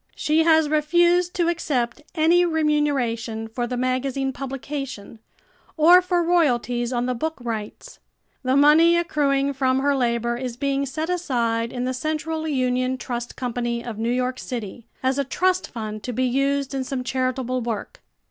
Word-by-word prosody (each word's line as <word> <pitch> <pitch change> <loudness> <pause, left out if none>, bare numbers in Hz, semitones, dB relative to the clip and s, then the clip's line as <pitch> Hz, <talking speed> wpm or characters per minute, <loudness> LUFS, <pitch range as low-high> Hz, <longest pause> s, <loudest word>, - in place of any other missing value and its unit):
She 310 +1 +2
has 320 -2 +5
refused 345 +4 +2
to 345 -2 +1
accept 295 -7 -1
any 335 +2 +4
remuneration 280 -9 0
for 240 +2 -3
the 250 0 -3
magazine 260 +1 -1
publication 270 -4 -6 0.6
or 345 +4 +7
for 355 -1 +1
royalties 245 -8 +1
on 245 -1 0
the 255 - 0
book 320 +7 -3
rights. 230 - -6 0.4
The 260 0 +1
money 320 +4 +6
accruing 280 -4 +1
from 260 -1 +1
her 285 0 +2
labor 235 -2 0
is 245 -2 -5
being 275 +1 -1
set 315 +5 -3
aside 235 -9 -1
in 245 - -3
The 255 +1 -1
Central 315 +3 -3
Union 255 -2 0
Trust 240 -1 -5
Company 240 -1 -3
of 225 -3 -6
New 230 +1 -1
York 255 +1 -1
City 235 -1 -6 0.2
as 260 +2 +1
a - - +2
trust 370 +7 0
fund 215 -2 -6
to 245 - -5
be 255 +3 0
used 275 +2 0
in 270 -1 -1
some 255 -1 -4
charitable 255 0 -1
work. 230 -3 -5
260 Hz, 160 wpm, -23 LUFS, 245-310 Hz, 0.6 s, or